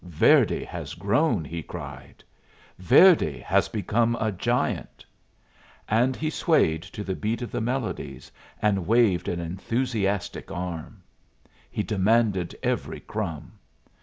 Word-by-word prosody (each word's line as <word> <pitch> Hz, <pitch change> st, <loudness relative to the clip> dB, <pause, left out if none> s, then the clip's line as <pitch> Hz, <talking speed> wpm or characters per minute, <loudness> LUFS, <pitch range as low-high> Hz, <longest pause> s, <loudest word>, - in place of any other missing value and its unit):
"Verdi 85 Hz, -4 st, +3 dB
has -, -, -7 dB
grown," 80 Hz, -, +1 dB
he 85 Hz, +3 st, -5 dB
cried. -, -, -9 dB, 0.6 s
"Verdi 125 Hz, -, +6 dB
has -, -, +1 dB
become 115 Hz, +2 st, 0 dB
a 110 Hz, -1 st, 0 dB
giant." 95 Hz, -, -2 dB, 0.8 s
And 125 Hz, +4 st, +2 dB
he 155 Hz, +3 st, -2 dB
swayed 80 Hz, -, +2 dB
to 90 Hz, +5 st, -8 dB
the 95 Hz, -, -3 dB
beat 110 Hz, +5 st, -2 dB
of 120 Hz, -, -6 dB
the -, -, -2 dB
melodies, 120 Hz, -3 st, -4 dB, 0.3 s
and 100 Hz, -5 st, +1 dB
waved 110 Hz, -5 st, +3 dB
an 85 Hz, -, -2 dB
enthusiastic 100 Hz, +3 st, -2 dB
arm. 90 Hz, -3 st, -6 dB, 0.7 s
He 105 Hz, -, -2 dB
demanded 105 Hz, -3 st, +1 dB
every -, -, -2 dB
crumb. 95 Hz, -8 st, -5 dB
105 Hz, 120 wpm, -25 LUFS, 90-115 Hz, 0.8 s, Verdi